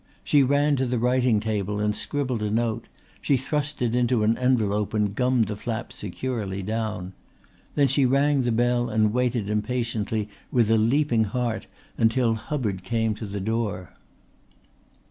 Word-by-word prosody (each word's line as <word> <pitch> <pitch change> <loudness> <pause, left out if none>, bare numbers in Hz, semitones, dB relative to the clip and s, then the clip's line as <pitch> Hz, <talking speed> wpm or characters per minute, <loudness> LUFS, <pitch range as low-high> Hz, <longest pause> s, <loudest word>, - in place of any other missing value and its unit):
She 145 - +4
ran 145 +2 +3
to 130 0 0
the 125 0 0
writing 125 -1 +2
table 105 -1 -2
and 105 0 0
scribbled 130 -5 -2
a 105 - -1
note; 115 +1 -1 0.3
she 140 - +2
thrust 145 +1 -2
it 115 -1 0
into 120 -2 +2
an 110 +2 +3
envelope 110 -5 +1
and 105 -2 +1
gummed 125 -1 +2
the 105 - -4
flap 115 +2 -5
securely 100 -1 -4
down. 105 -3 -3 0.6
Then 145 -2 +4
she 135 0 +3
rang 140 +2 +3
the 120 -1 0
bell 120 +1 +1
and 110 -1 +2
waited 125 -4 0
impatiently 110 -1 -1 0.2
with 115 -3 +3
a 115 - +5
leaping 120 0 +2
heart 120 +2 -2 0.3
until 115 +1 +3
Hubbard 110 - -3
came 110 +2 0
to 105 0 -7
the 100 +1 -4
door. 100 - -2
115 Hz, 160 wpm, -25 LUFS, 105-125 Hz, 0.6 s, a